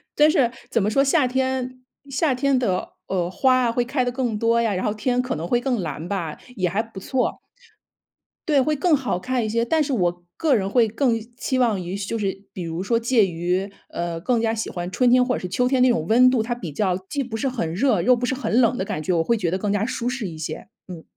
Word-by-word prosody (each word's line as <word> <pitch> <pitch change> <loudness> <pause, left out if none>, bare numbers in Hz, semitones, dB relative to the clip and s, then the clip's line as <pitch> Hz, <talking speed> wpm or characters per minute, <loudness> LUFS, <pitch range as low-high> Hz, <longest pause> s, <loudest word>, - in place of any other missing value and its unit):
但 300 +1 +6
是 255 -6 +3 0.2
怎 235 -3 +1
么 200 - +1
说， 275 +6 +3
夏 280 -1 +3
天 260 0 -2 0.3
夏 275 +1 +1
天 270 +1 +1
的， 205 -8 -1
呃， 180 -2 -1
花 255 +6 +3
啊， 235 - +2
会 245 +1 +1
开 255 +1 0
得 245 - -1
更 245 -4 -2
多 230 +1 +2
呀， 225 -3 +1
然 185 - -2
后 210 - 0
天 245 +4 0
可 255 - -3
能 160 +2 -4
会 240 - +2
更 250 -2 0
蓝 165 -1 -5
吧， 175 -6 -3 0.2
也 185 -5 0
还 200 +5 0
不 225 -4 -10
错。 255 +6 -1 1.1
对， 295 -3 +4
会 305 +3 +1
更 315 +2 +3
好 260 -9 -2
看 250 +3 -1
一 215 - -2
些， 230 +1 +1
但 310 +6 +2
是 285 -1 -2
我 175 -5 -1
个 305 -5 +2
人 195 -4 0
会 230 +1 +3
更 230 +1 +1 0.2
期 260 0 -1
望 225 -6 +2
于 180 +2 -5
就 200 +3 -3
是 195 -2 -3
比 185 - -5
如 165 +1 -4
说 230 +4 +1
介 230 -2 +3
于 180 +2 -1 0.2
呃， 170 -1 -3
更 235 +6 +1
加 225 -1 +1
喜 225 -1 -3
欢 175 0 -4
春 250 +6 +3
天 250 +1 +5
或 250 0 0
者 - - -3
是 180 - -5
秋 250 +7 +1
天 260 0 +2
那 255 - +6
种 160 -10 0
温 250 +4 +6
度， 255 -3 +2
它 240 +2 -2
比 185 -10 -7
较 180 +4 0
既 285 -1 -1
不 225 -3 -5
是 270 - -1
很 230 -11 -2
热， 215 -1 +2
又 250 +8 +5
不 245 +1 -2
是 255 - -1
很 255 -3 0
冷 240 +1 +2
的 - - -1
感 155 -5 -4
觉， 185 - 0
我 165 -1 +2
会 235 +5 +1
觉 175 -5 -1
得 185 - 0
更 200 +1 -2
加 205 +1 +1
舒 240 0 -2
适 250 -5 -3
一 160 -3 -8
些。 155 0 -6 0.2
嗯。 170 -3 -9
230 Hz, 280 characters per minute, -23 LUFS, 190-255 Hz, 1.1 s, 但